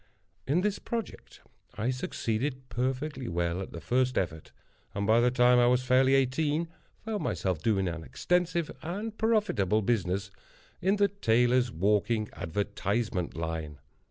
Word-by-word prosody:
In 155 +7 +2
this 205 0 0
project 230 -2 -6 0.3
I 115 +4 0
succeeded 130 +1 -3
perfectly 130 +3 -2
well 85 0 -1
at 95 - -7
the 85 - -7
first 125 - +1
effort, 80 -4 -2 0.4
and 100 0 -1
by 110 +2 +5
the 120 +1 +4
time 125 0 +5
I 120 - +5
was 125 +1 +3
fairly 130 +1 +4
eighteen, 150 +5 +1 0.4
found 220 -2 -2
myself 90 -5 -1
doing 95 -1 +1
an 85 -1 -4
extensive 175 - 0
and 205 +6 -4
profitable 205 - +1
business 95 -3 0 0.5
in 190 +3 +3
the 205 -1 +4
Tailor's 125 - +2
Walking 105 +4 +1
Advertisement 100 +1 -2
line. 80 -2 -4
120 Hz, 140 wpm, -29 LUFS, 95-150 Hz, 0.5 s, by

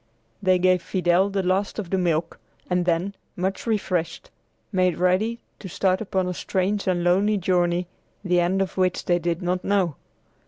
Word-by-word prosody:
They 185 -2 +4
gave 185 0 +3
Fidel 180 +1 +2
the 195 -1 -1
last 190 +2 0
of 195 -6 -5
the 190 - +2
milk, 165 -2 -1 0.3
and 180 -1 0
then, 175 +3 0 0.2
much 190 +5 -3
refreshed, 180 -6 -2 0.4
made 185 -3 +1
ready 185 +6 +1 0.2
to 190 - -8
start 185 +2 +1
upon 190 -3 -1
a 180 - -2
strange 190 +3 -1
and 175 -2 +1
lonely 195 +4 +3
journey 175 -1 +1 0.4
the 180 -2 +2
end 185 +3 +2
of 190 - -8
which 185 -1 +1
they 175 -1 +2
did 170 +1 -2
not 180 +1 -1
know. 190 -6 +1
185 Hz, 170 wpm, -24 LUFS, 175-195 Hz, 0.4 s, They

